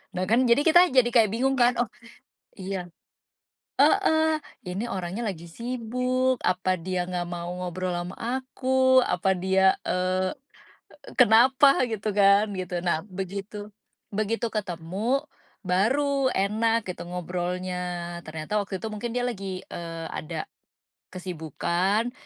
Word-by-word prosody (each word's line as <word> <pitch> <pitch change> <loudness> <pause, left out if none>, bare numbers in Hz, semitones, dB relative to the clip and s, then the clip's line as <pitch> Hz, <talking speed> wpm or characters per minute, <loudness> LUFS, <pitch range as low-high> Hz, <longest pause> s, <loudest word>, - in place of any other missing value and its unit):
Nah, 185 - -1
kan 235 +6 +4
jadi 235 +4 +5
kita 350 +2 +6
jadi 255 -2 +5
kayak 230 -4 +5
bingung 265 +4 +1
kan, 245 0 +4
oh, 240 - +2 0.7
iya 190 -2 -5 0.9
heeh, 315 0 +4 0.3
ini 200 +7 -3
orangnya 190 +4 -4
lagi 170 -4 -5
sibuk, 250 +5 -1
apa 185 0 +1
dia 180 0 -3
nggak 180 -1 -2
mau 175 0 -5
ngobrol 180 0 -3
ama 175 +1 -4 0.3
aku, 260 0 +3
apa 190 -2 +1
dia, 190 +1 +3 0.2
eee, 185 +1 0 0.9
kenapa 255 +4 +6
gitu 215 -1 -2
kan, 200 +1 +5
gitu. 185 -2 -4
Nah, 165 -2 +1
begitu 200 +2 -6 0.4
begitu 215 +3 -1
ketemu, 205 - -2 0.4
baru 265 +9 +2
enak 220 +3 +1
gitu - - -8
ngobrolnya. 180 +1 -3 0.4
Ternyata 160 +7 -2
waktu 195 -1 -4
itu 225 - -3
mungkin 230 +3 -4
dia 245 - 0
lagi, 195 -6 -4
eee, 165 -1 -6
ada 155 0 -5 0.7
kesibukan, 185 - -1
195 Hz, 125 wpm, -26 LUFS, 180-240 Hz, 0.9 s, kita